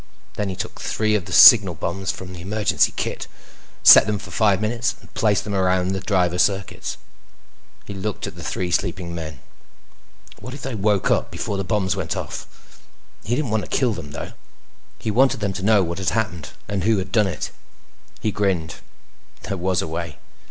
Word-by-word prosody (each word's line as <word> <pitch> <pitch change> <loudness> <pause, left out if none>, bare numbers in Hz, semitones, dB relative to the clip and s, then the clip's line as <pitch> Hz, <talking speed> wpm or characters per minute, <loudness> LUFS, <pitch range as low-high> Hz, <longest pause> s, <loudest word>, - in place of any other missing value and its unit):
Then 105 -1 -3
he 95 - -4
took - - -6
three 110 -1 0
of 100 -5 0
the - - -9
signal 100 -7 +8
bombs 95 +4 -4
from 90 -1 -9
the 85 - -9
emergency 105 +3 +1
kit, - - -4 0.6
set - - +9
them 105 -1 0
for 105 - -10
five 100 -4 +2
minutes, 115 +3 -1
and - - -20
placed 110 -6 +1
them 105 - -5
around 95 -1 +1
the 95 0 -1
driver 90 -2 0
circuits. 95 0 -1 0.9
He 100 - -7
looked 100 +1 -4
at - - -7
the - - -10
three 90 -1 -3
sleeping 85 -1 -1
men. 80 -5 -7 1.0
What 125 +5 -8
if - - -10
they 135 - -4
woke 105 -2 +1
up - - +1
before 100 - -4
the 95 - -2
bombs 95 -1 0
went - - -3
off? - - -6 0.8
He 120 - -1
didn't 135 -5 -2
want 110 0 +1
to - - -9
kill 125 -4 +1
them 75 -7 -8
though. 75 - -7 0.6
He 110 - -3
wanted 130 +2 +3
them 100 -2 -2
to 95 - -6
know 105 -1 +4
what 85 +1 -4
had 95 - 0
happened 100 -8 -2 0.2
and 100 -3 -2
who 110 +1 +3
had 95 - -4
done 105 -3 +3
it. 95 - -4 0.7
He 110 - 0
grinned. 95 -6 -1 0.7
There 100 - -3
was 95 +1 0
a - - -4
way. 80 - -5
100 Hz, 195 wpm, -22 LUFS, 90-110 Hz, 1.0 s, set